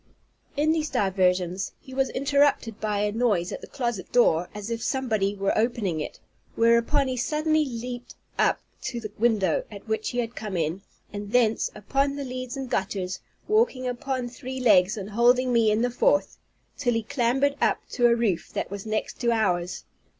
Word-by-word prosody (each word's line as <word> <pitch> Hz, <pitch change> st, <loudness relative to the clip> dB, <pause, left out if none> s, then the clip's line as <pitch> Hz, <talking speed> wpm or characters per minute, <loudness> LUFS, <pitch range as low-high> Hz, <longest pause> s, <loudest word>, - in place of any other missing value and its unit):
In 305 Hz, +2 st, +3 dB
these 315 Hz, -1 st, 0 dB
diversions 185 Hz, -4 st, +1 dB
he 260 Hz, -3 st, -13 dB
was 265 Hz, 0 st, +1 dB
interrupted 280 Hz, -5 st, +1 dB
by 210 Hz, -1 st, 0 dB
a 210 Hz, 0 st, +1 dB
noise 210 Hz, -6 st, +1 dB
at -, -, -5 dB
the -, -, -9 dB
closet 235 Hz, -8 st, -3 dB
door, 175 Hz, -8 st, +3 dB
as 210 Hz, +2 st, -6 dB
if 230 Hz, 0 st, -2 dB
somebody 220 Hz, -7 st, 0 dB
were 195 Hz, 0 st, 0 dB
opening 215 Hz, -7 st, 0 dB
it; 150 Hz, -, -6 dB, 0.4 s
whereupon 235 Hz, +5 st, +3 dB
he 255 Hz, -, -1 dB
suddenly 310 Hz, +4 st, +1 dB
leaped 245 Hz, -2 st, -6 dB, 0.2 s
up -, -, +3 dB, 0.2 s
to 250 Hz, -2 st, -3 dB
the 215 Hz, -2 st, -7 dB
window, 225 Hz, -, +2 dB
at -, -, -11 dB
which 440 Hz, -1 st, -1 dB
he 245 Hz, -, -5 dB
had 240 Hz, -1 st, -2 dB
come 210 Hz, -4 st, -4 dB
in, 165 Hz, +3 st, -1 dB, 0.3 s
and 205 Hz, 0 st, -6 dB
thence 225 Hz, -3 st, +3 dB
upon 275 Hz, +7 st, 0 dB
the 285 Hz, -1 st, -4 dB
leads 255 Hz, +1 st, -5 dB
and 265 Hz, -2 st, -5 dB
gutters, 190 Hz, -1 st, -2 dB, 0.3 s
walking 425 Hz, -, +2 dB
upon 255 Hz, 0 st, -2 dB
three 260 Hz, +1 st, -7 dB
legs, 210 Hz, -4 st, +4 dB
and 200 Hz, 0 st, -6 dB
holding 245 Hz, +3 st, +3 dB
me 230 Hz, -2 st, +4 dB
in 215 Hz, +2 st, +2 dB
the 245 Hz, -, +1 dB
fourth, 290 Hz, +4 st, +1 dB, 0.4 s
till 245 Hz, -3 st, +1 dB
he 230 Hz, -, 0 dB
clambered 270 Hz, +4 st, +1 dB
up -, -, +3 dB
to 240 Hz, -1 st, +4 dB
a 235 Hz, -, +4 dB
roof 215 Hz, -8 st, 0 dB
that -, -, -3 dB
was 200 Hz, +1 st, -6 dB
next 215 Hz, 0 st, -2 dB
to 235 Hz, -1 st, +2 dB
ours. 180 Hz, -6 st, 0 dB
235 Hz, 185 wpm, -26 LUFS, 205-260 Hz, 0.4 s, legs